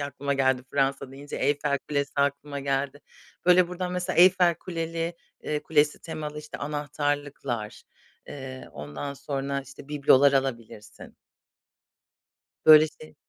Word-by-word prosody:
aklıma 140 0 -2
geldi 130 -2 +2
Fransa 135 -1 0
deyince, 140 +2 -8
Eyfel 140 0 +1
Kulesi 140 -1 -1
aklıma 140 0 -1
geldi. 140 +1 -2 0.5
Böyle, 180 -1 +6
buradan 180 0 -4
mesela 180 0 -2
Eyfel 180 -1 +6
Kuleli, 165 0 -4 0.3
eee, 150 -1 -2
Kulesi 150 -1 +2
temalı 150 -2 -6
işte 150 0 -8
anahtarlıklar, 145 -5 -3 0.4
eee, 130 -2 -8
ondan 75 - -6
sonra, 140 0 -3
işte, 140 +1 -13
biblolar 140 -1 +5
alabilirsin. 115 -6 -4 1.5
Böyle, 155 0 +9
şey 155 - -13
145 Hz, 115 wpm, -26 LUFS, 135-155 Hz, 1.5 s, Böyle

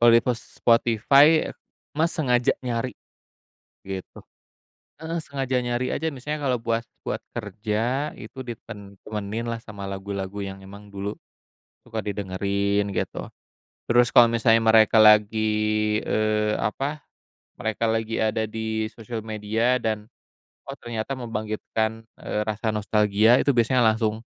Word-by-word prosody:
Kalau 120 0 +7
di 115 - +7
pos 120 -2 -1 0.2
Spotify, 135 +7 +4 0.4
Mas 160 +3 +1
sengaja 125 -6 +2
nyari, 120 0 -2 0.9
gitu, 95 -1 -7 0.8
heeh, 165 +1 -3
sengaja 135 -4 -2
nyari 120 +1 -1
aja 160 - -1
misalnya 150 +1 -4
kalo 125 - +2
buat 115 -1 -1 0.2
buat - - -3 0.2
kerja 115 +6 -2
itu 130 - -10
ditem 105 -5 -9
temenin 105 +1 -4
lah 115 -1 -3
sama 105 -3 -9
lagu-lagu 100 0 -5
yang 95 -1 -6
emang 100 +2 -12
dulu, 100 0 -4 0.8
suka 115 -2 -4
didengerin 100 0 -1
gitu, 95 - -4 0.6
terus 120 +1 +5
kalau 120 -1 +8
misalnya 115 -1 +3
mereka 110 0 +5
lagi, 110 0 +5 0.6
eee, 105 0 +1
apa, 140 +7 -2 0.5
mereka 110 +1 -1
lagi 110 0 -1
ada 110 0 +1
di 110 0 -3
sosial 115 -1 -7
media 110 +3 0
dan, 110 -2 -2 0.7
oh - - -7
ternyata 120 +3 -4
membangkitkan, 110 -1 -3 0.2
eee, 105 - -2
rasa 110 +1 -1
nostalgia 105 +2 +3
itu - - +2
biasanya 125 0 +3
langsung, 110 -1 +1
110 Hz, 130 wpm, -24 LUFS, 105-120 Hz, 0.9 s, kalau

